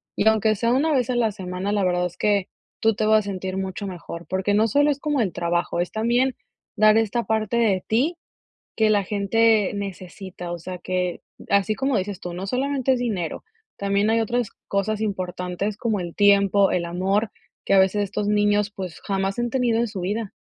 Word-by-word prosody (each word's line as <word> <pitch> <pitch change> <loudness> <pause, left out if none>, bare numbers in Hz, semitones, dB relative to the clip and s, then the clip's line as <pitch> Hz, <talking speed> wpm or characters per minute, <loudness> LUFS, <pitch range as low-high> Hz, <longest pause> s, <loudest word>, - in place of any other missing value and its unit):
Y 215 - +1
aunque 220 0 +3
sea 230 +3 0
una 300 +5 +2
vez 250 -3 +1
a - - -1
la 230 -3 +2
semana, 185 0 -4
la 205 -1 +1
verdad, 180 0 +1
es 175 0 -14
que 205 -2 +1 0.3
tú 225 -1 +3
te 215 - 0
vas 215 0 +5
a - - -2
sentir 190 -1 -4
mucho 190 +1 -4
mejor, 170 -2 -8
porque, 190 +2 0
no 220 +2 +4
solo 290 +7 +3
es 285 - -3
como 295 -3 0
el 195 -5 0
trabajo, 175 0 -1
es 175 - -1
también 240 +4 +1 0.4
dar 215 +1 +6
esta 225 +1 0
parte 220 +1 0
de 205 -6 +2
ti, 275 +10 +1 0.6
que 220 -1 +3
la 205 -2 +3
gente 210 +1 +2
necesita, 185 -2 -7
o - - -4
sea 180 +2 -7
que 180 -1 -2 0.3
Así 200 +2 +2
como 265 +1 0
dices 195 0 -3
tú, 175 - -5
no 185 +3 -5
solamente 265 +2 0
es 250 - -1
dinero, 200 -9 -3 0.3
también, 200 +1 +1
hay 225 0 +3
otras 235 0 -1 0.2
cosas 205 +2 -1
importantes 185 0 -3
como 220 -3 -1
el 170 -1 -7
tiempo, 200 -1 +4
el 180 - 0
amor, 195 +5 0 0.3
que - - +1
a 195 - +7
veces 190 +2 +3
estos 205 +1 -3
niños, 205 0 +2
pues, 185 -4 -6
jamás 195 +1 -2
han 240 0 0
tenido 240 -3 +1
en 235 - +1
su 200 -3 -6
vida. 205 +3 -2
205 Hz, 205 wpm, -23 LUFS, 185-225 Hz, 0.6 s, a